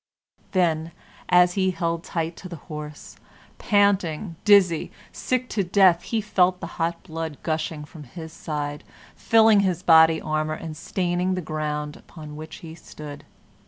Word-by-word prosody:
Then, 165 -3 +1 0.4
as 180 0 +5
he 190 -1 +1
held 170 -2 -2
tight 165 0 -3
to 185 - -9
the 170 - -6
horse, 150 -2 -9 0.4
panting, 200 -4 +1
dizzy, 195 -6 +4 0.2
sick 255 0 -2
to 205 - 0
death, 180 -2 +4
he 225 +3 -2
felt 185 -3 +2
the 170 - -5 0.2
hot 170 +1 -1
blood 160 -4 -5
gushing 155 -1 -2
from 150 0 -12
his 160 +4 -10
side, 150 -3 -4 0.3
filling 220 -2 +5
his 185 -3 0
body 160 -1 +6
armor, 155 0 -2
and 160 -1 -7
staining 180 +3 -1
the - - -2
ground 150 -2 -3
upon 150 -3 -11
which 155 +1 -8
he 160 - -8
stood. 150 -3 -10
165 Hz, 150 wpm, -24 LUFS, 155-185 Hz, 0.4 s, body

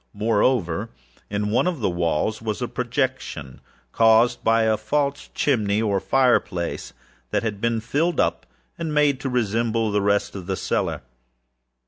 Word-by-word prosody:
Moreover, 105 -4 +1 0.4
in 105 +1 -1
one 120 - +2
of 175 -5 -1
the 110 - 0
walls 85 +5 -1
was 110 -2 -3
a 125 - -2
projection, 125 - -3 0.3
caused 115 +1 +4
by 115 0 +3
a 110 -1 +3
false 140 +6 -1
chimney, 105 -7 +1
or 105 -3 +1
fireplace, 120 -9 0 0.4
that - - 0
had 105 -3 -3
been 115 -1 +1
filled 145 +10 0
up, - - 0 0.3
and 160 -2 -3
made 145 -3 +3
to 135 - -3
resemble 115 -2 0
the 105 0 +1
red 100 0 +2
of 95 -3 -8
the 95 - -1
cellar. - - -2
115 Hz, 150 wpm, -23 LUFS, 100-130 Hz, 0.4 s, caused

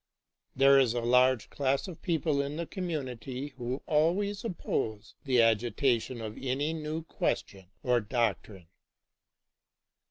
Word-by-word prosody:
There 135 +1 +6
is 125 -3 +2
a - - +1
large 125 0 +3
class 140 +4 0
of 175 -4 -9
people 155 -4 +1
in 140 +1 -4
the 170 +1 -3
commun 170 -7 -3
ity 125 +3 -6
who 130 -1 -5
always 190 +8 +1
oppose 110 - -3
the 125 -4 +4
agitation 120 +2 +1
of 110 -1 -6
any 135 +4 -1
new 155 0 -4
question 95 - -3 0.2
or 125 -1 +3
doctrine. 105 -4 -2
130 Hz, 130 wpm, -30 LUFS, 120-155 Hz, 0.2 s, There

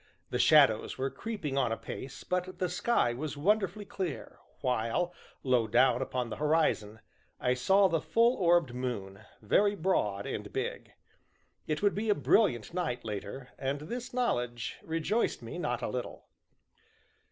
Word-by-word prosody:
The - - -1
shadows - - +5
were 135 +1 -1
creeping 175 -12 -3
on 125 -4 +1
apace, 115 +4 -6
but 180 0 -2
the 180 - -1
sky 180 - +1
was 145 +4 -5
wonderfully 205 +4 +1
clear, 185 -6 -5 0.2
while, 125 +7 0 0.3
low 125 -4 +2
down 125 +3 +4
upon 125 -3 -2
the - - -4
horizon, 150 -9 +1 0.4
I 125 - +2
saw 190 +11 +4
the 165 -3 0
full 230 +7 +3
orbed 170 -7 +3
moon, 105 -7 -4 0.2
very 200 - +3
broad 105 - 0
and - - -5
big. - - -4 0.8
It 155 +4 -2
would 205 - +4
be 215 +2 -2
a 205 - +5
brilliant 170 - +2
night 160 -10 -2
later, 110 +5 -6
and 140 +2 -2
this 245 +10 -5
knowledge 120 - -1
rejoiced 165 +8 -1
me - - -6
not - - -2
a - - 0
little. - - -5
150 Hz, 150 wpm, -30 LUFS, 120-190 Hz, 0.8 s, shadows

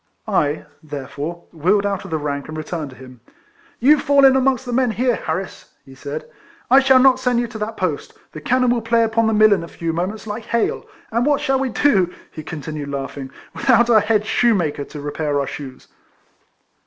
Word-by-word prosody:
I, 145 +1 0 0.2
therefore, 145 +3 -6
wheeled 185 +6 +1
out 200 -1 -2
of - - -8
the 160 - -1
rank, 145 -2 -4
and 155 0 -7
returned 155 -1 -5
to 130 - -13
him. 125 -2 -14 0.3
" 335 0 -32
You 300 0 +7
fall 280 -1 +4
in 265 -1 +6
amongst 265 -1 +1
the 245 - -4
men 255 0 +2
here, 245 +2 +1
Harris," 190 -2 -5
he 135 - -14
said. 145 +3 -6 0.2
" 335 -6 -29
I 265 - +8
shall 265 -1 +5
not 260 0 +5
send 250 -2 +1
you 240 - 0
to 220 - -8
that 215 +1 -4
post. 165 -6 -3
The 155 - -9
cannon 250 +5 +2
will 240 -1 0
play 230 +1 +2
upon 225 0 +1
the 220 - +1
mill 215 0 +6
in 185 -4 -1
a - - -7
few 165 0 -4
moments 190 +6 -3
like 215 +1 -6
hail; 235 -1 -1 0.2
and 235 +2 +1
what 290 +1 +2
shall 270 -3 0
we 270 -1 -1
do," 200 -9 +2 0.2
he 155 - -8
continued, 150 -1 -6
laughing, 135 -1 -5
" - - -26
without 235 +1 +3
our 220 - +7
head 210 0 +1
shoemaker 180 -12 +1
to 150 - -10
repair 145 0 -2
our 140 - -1
shoes 135 -2 -9
205 Hz, 215 wpm, -20 LUFS, 150-245 Hz, 0.3 s, I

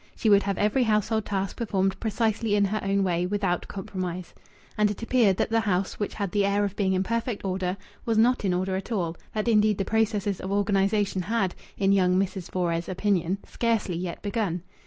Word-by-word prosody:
She 220 - +1
would 200 0 +7
have 200 -2 -2
every 215 +5 +2
household 220 0 +1
task 195 -1 -2
performed 195 -4 0
precisely 220 -1 0
in 205 -1 +3
her 215 +2 -1
own 195 0 +1
way, 175 -1 0
without 195 -3 -1
compromise. 185 -3 -5 0.4
And 210 0 +3
it 210 +2 -5
appeared 230 -6 +3
that - - 0
the 225 - +3
house, 195 -3 -1
which 205 - -3
had 200 -4 -2
the 205 +1 +2
air 200 +1 +2
of 200 -1 -4
being 190 -2 +1
in 185 0 +1
perfect 230 0 -2
order, 185 0 -1 0.3
was 225 -2 0
not 240 +2 +3
in 195 - +1
order 185 +1 0
at 195 +5 -5
all, 175 -6 -1 0.2
that 215 +1 -1
indeed 215 -2 +4
the 195 - -1
processes 210 -3 0
of 190 - -4
organization 200 -1 +1
had, 195 -1 0 0.2
in 195 -1 +2
young 185 -2 +3
Mrs. 190 -1 -1
Fores' 170 -1 -1
opinion, 185 -1 0
scarcely 225 -6 0
yet 175 0 -5
begun. 200 -5 -1
200 Hz, 200 wpm, -26 LUFS, 185-215 Hz, 0.4 s, would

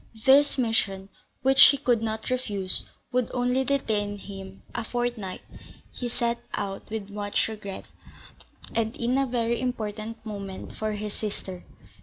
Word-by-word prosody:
This 285 +2 +7
mission, 200 -5 +1 0.3
which 270 0 +9
he 280 - +7
could 245 -4 +2
not 220 +1 -2
refuse, 205 -7 -1 0.3
would 250 -1 +1
only 250 +1 +2
detain 215 -7 +1
him 195 -1 -9
a 235 - -2
fortnight: 240 -5 -2 0.5
he 245 - -4
set 235 0 0 0.2
out 195 -1 -4
with 210 -2 -4
much 205 0 +1
regret, 210 -3 -6 0.9
and 225 0 0
in 240 +2 +1
a 270 0 +3
very 235 -1 0
important 225 -2 -3
moment 200 -3 -6
for 215 0 -1
his 210 0 -4
sister. 190 -4 -5
220 Hz, 140 wpm, -27 LUFS, 205-245 Hz, 0.9 s, which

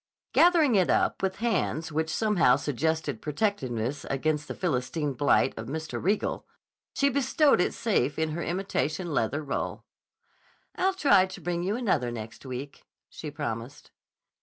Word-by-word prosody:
Gathering 330 -6 +5
it 190 -4 +3
up - - +2
with 190 -1 0
hands 195 -8 -1
which 160 +1 -1
somehow 180 - +3
suggested 150 -2 -1
protectiveness 145 - -2
against 150 +2 -1
the - - -5
Philistine 145 -2 -1
blight 135 0 +3
of 110 - -6
Mr. 160 +4 -4
Riegel, 200 +4 0 0.5
she 280 - +3
bestowed 280 - +3
it - - +1
safe 145 - 0
in 160 0 0
her 170 +3 -3
imitation 175 -2 -2
leather 145 +5 0
roll. 140 - -3 0.9
"I'll 380 +1 +1
try 205 - +5
to 190 +1 -9
bring 175 +1 -2
you 195 +4 -1
another 205 - 0
next 115 +2 -8
week," 130 +2 -7 0.2
she 155 - -7
promised. 140 -2 -6
160 Hz, 145 wpm, -27 LUFS, 140-200 Hz, 0.9 s, Gathering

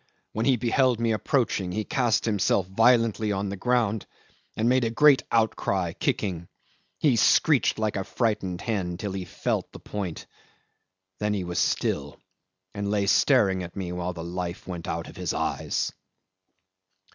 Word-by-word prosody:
"When 110 +3 -1
he 135 - +5
beheld 125 +1 +2
me 115 -1 +1
approaching 110 -4 0
he 105 +4 -2
cast 125 -3 +1
himself 100 -3 +1
violently 110 +1 +3
on 100 0 -2
the 100 - -4
ground 110 -1 0 0.5
and 110 - +1
made 130 +1 +3
a 115 - +1
great 140 +4 +5
outcry, 100 -6 +1
kicking. 85 -4 -2 0.5
He 140 -6 +3
screeched 140 +5 +4
like 110 -1 -1
a 95 - -1
frightened 95 -5 -1
hen 95 -6 -2
till 100 +1 -4
he 95 -1 -4
felt 85 - -2
the - - -11
point; 100 -5 -5 0.9
then 105 0 0
he 95 - -2
was 90 0 -3
still, - - -1 0.6
and 100 0 -3
lay 100 -1 +1
staring 100 -3 +3
at 85 -1 -8
me 95 -3 -4
while 90 0 -3
his 85 0 -6
life 90 0 -5
went 85 -3 -6
out - - -3
of - - -12
his - - -2
eyes." - - -1
105 Hz, 160 wpm, -26 LUFS, 95-115 Hz, 0.9 s, he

